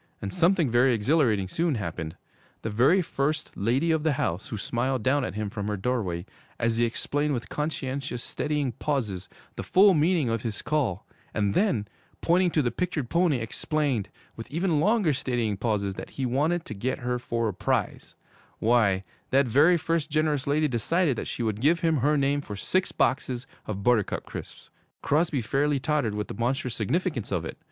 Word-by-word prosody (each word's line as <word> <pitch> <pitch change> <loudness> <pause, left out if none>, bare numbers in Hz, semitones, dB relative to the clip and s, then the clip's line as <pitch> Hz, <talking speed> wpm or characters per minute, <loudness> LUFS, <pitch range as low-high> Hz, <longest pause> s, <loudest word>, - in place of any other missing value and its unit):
And 100 - -5
something 175 -5 +3
very 120 +1 +4
exhilarating 110 - +2
soon 165 - 0
happened. 80 -6 -4 0.5
The 110 - -2
very 135 - +4
first 150 0 -2
'lady 130 +11 +1
of 160 -1 +2
the 155 -1 +2
house' 85 -7 -2
who 110 - -5
smiled 120 +3 -1
down 140 +2 +2
at 100 - -4
him 105 -1 -3
from 105 -2 -4
her 105 -1 -1
doorway, 95 -6 -2 0.3
as 115 -1 +1
he 120 - +3
explained 145 +5 -1
with 115 -2 -5
conscientious, 135 -4 -3
steadying 150 -3 -1
pauses, 105 -8 -2 0.3
the - - -2
full 195 +1 +5
meaning 160 -2 +2
of 115 -1 -1
his 110 -3 -4
call, 130 - -1 0.3
and 100 -2 +1
then, 125 - +1 0.3
pointing 180 +2 +3
to 155 -3 +1
the 120 - 0
pictured 165 -9 -2
pony, 170 -4 +3
explained, 125 0 -1 0.3
with 115 - -8
even 165 +1 +1
longer 200 -2 +3
steadying 120 -5 -1
pauses, 100 -2 -1
that - - -8
he 135 - -3
wanted 155 +8 +1
to - - -6
get 125 +7 -3
her 125 0 -1
for 115 -1 -1
a 105 - -2
prize - - -2 0.4
why, 110 -5 +3 0.3
that 135 +1 +4
very 145 +9 +5
first 165 -1 -1
generous 150 -2 0
lady 150 +2 +2
decided 145 +5 +1
that - - -4
she 120 - -3
would 110 -1 -2
give 165 +5 +3
him 165 -2 +2
her 145 +4 +2
name 140 +1 +1
for 105 - -7
six 185 - 0
boxes 130 -1 0 0.2
of 100 -2 -4
Buttercup 115 -4 +1
Crisps! - - -9 0.3
Crosby 150 -3 +1
fairly 140 +5 +1
tottered 140 -7 0
with 105 0 -3
the - - -6
monstrous 125 +3 -1
significance 130 - -1
of 85 -4 -1
it. - - -7
130 Hz, 185 wpm, -27 LUFS, 110-155 Hz, 0.5 s, full